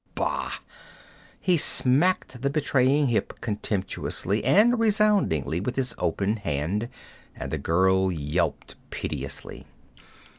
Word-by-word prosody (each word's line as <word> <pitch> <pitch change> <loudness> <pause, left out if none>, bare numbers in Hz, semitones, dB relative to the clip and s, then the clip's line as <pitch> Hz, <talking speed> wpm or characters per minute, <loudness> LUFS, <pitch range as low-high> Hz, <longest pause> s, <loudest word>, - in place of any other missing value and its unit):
Bah!' - - -2 0.9
He 180 -2 +2
smacked 135 -2 +2
the 140 - +1
betraying 140 -1 +2
hip 115 - -1
contemptuously 105 -1 -2
and 215 - +4
resoundingly 205 - +2
with 120 +7 -3
his 130 -3 -1
open 100 +6 0
hand, 100 +5 -2 0.5
and - - -6
the - - -2
girl 95 +2 +2
yelped 75 -3 -2
piteously. 70 -1 -6
115 Hz, 105 wpm, -25 LUFS, 95-145 Hz, 0.9 s, and